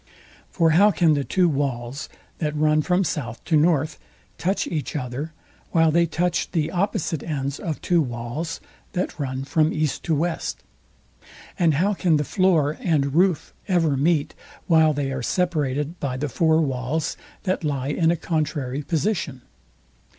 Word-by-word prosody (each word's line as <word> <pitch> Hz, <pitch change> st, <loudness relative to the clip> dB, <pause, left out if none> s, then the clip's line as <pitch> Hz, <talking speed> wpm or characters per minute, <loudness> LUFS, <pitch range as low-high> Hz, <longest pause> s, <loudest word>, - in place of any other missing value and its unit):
For 165 Hz, -3 st, +2 dB
how 195 Hz, +7 st, +6 dB
can 170 Hz, -6 st, +3 dB
the 145 Hz, -1 st, 0 dB
two 180 Hz, +5 st, +2 dB
walls, 135 Hz, -3 st, -2 dB, 0.3 s
that 150 Hz, -2 st, -1 dB
run 155 Hz, 0 st, +3 dB
from 180 Hz, +4 st, +2 dB
south 125 Hz, -9 st, -4 dB
to 160 Hz, -, +2 dB
north, 155 Hz, -1 st, +2 dB, 0.4 s
touch 190 Hz, +3 st, 0 dB
each 155 Hz, -4 st, -3 dB
other, 135 Hz, +3 st, -4 dB, 0.4 s
while 165 Hz, -1 st, +4 dB
they 170 Hz, +2 st, +3 dB
touch 175 Hz, +1 st, 0 dB
the 160 Hz, -2 st, 0 dB
opposite 185 Hz, -4 st, -1 dB
ends 140 Hz, -3 st, -3 dB
of 160 Hz, -4 st, -3 dB
two 175 Hz, -2 st, +3 dB
walls, 120 Hz, +5 st, -4 dB, 0.3 s
that 180 Hz, -3 st, -2 dB
run 130 Hz, -2 st, -3 dB
from 155 Hz, +3 st, +2 dB
east 155 Hz, -3 st, -1 dB
to 160 Hz, -, +2 dB
west? 155 Hz, -, -2 dB, 1.0 s
And 165 Hz, -4 st, +4 dB
how 195 Hz, +8 st, +2 dB
can 175 Hz, -5 st, +2 dB
the 150 Hz, -, 0 dB
floor 160 Hz, -4 st, +2 dB
and 150 Hz, -, +1 dB
roof 180 Hz, 0 st, +2 dB
ever 165 Hz, -7 st, +2 dB
meet, 150 Hz, +2 st, +1 dB, 0.3 s
while 160 Hz, -2 st, +5 dB
they 140 Hz, -2 st, -2 dB
are 130 Hz, -1 st, -3 dB
separated 150 Hz, 0 st, -1 dB
by 130 Hz, -3 st, -2 dB
the 145 Hz, +2 st, -2 dB
four 160 Hz, +5 st, +3 dB
walls, 140 Hz, +2 st, -1 dB, 0.3 s
that 185 Hz, -3 st, -1 dB
lie 140 Hz, -3 st, -1 dB
in 160 Hz, +2 st, +2 dB
a 170 Hz, -, +2 dB
contrary 150 Hz, -5 st, -2 dB
position? 155 Hz, -, -2 dB
155 Hz, 160 wpm, -23 LUFS, 140-170 Hz, 1.0 s, how